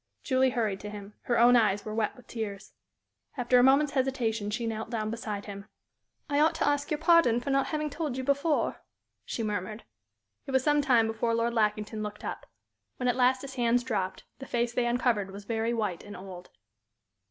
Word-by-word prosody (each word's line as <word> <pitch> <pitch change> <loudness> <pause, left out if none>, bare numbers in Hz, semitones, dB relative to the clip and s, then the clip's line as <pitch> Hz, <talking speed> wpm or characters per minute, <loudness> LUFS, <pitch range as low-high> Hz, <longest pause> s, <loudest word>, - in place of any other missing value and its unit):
Julie 260 -1 +3
hurried 220 -6 -1
to 210 - -7
him. 205 0 -9
Her 240 - +1
own 240 +1 +6
eyes 210 -4 +2
were 215 - -4
wet 215 -1 -1
with 250 - -16
tears. 210 -3 -6 0.6
After 245 0 +3
a - - +5
moment's 275 +2 +5
hesitation 245 -6 -1
she 230 +3 -2
knelt 225 -1 -4
down 215 -2 -2
beside 215 -3 -5
him. 200 -1 -8 0.6
"I 290 -1 +1
ought 315 +2 +4
to 325 - 0
ask 290 0 0
your 300 - 0
pardon 315 -7 +4
for 260 +3 -3
not 275 0 +2
having 305 -1 -2
told 295 -4 -3
you 260 - -3
before," 280 +3 0 0.4
she 230 - -3
murmured. 210 +1 -3 0.6
It - - -4
was 265 -1 +3
some 295 0 +3
time 250 -6 +4
before 225 +1 0
Lord 230 +1 0
Lackington 215 -1 0
looked 210 0 -6
up. - - -6 0.5
When 250 - -1
at 245 - +2
last 255 +1 +3
his 270 -1 -7
hands 245 -1 +2
dropped, 195 -7 -2 0.2
the 270 - -8
face 240 0 -1
they 240 0 +1
uncovered 235 -5 +1
was 200 +1 -10
very 225 +1 -1
white 210 -7 -2
and 205 - -9
old. 185 -2 -10
235 Hz, 200 wpm, -29 LUFS, 210-265 Hz, 0.6 s, own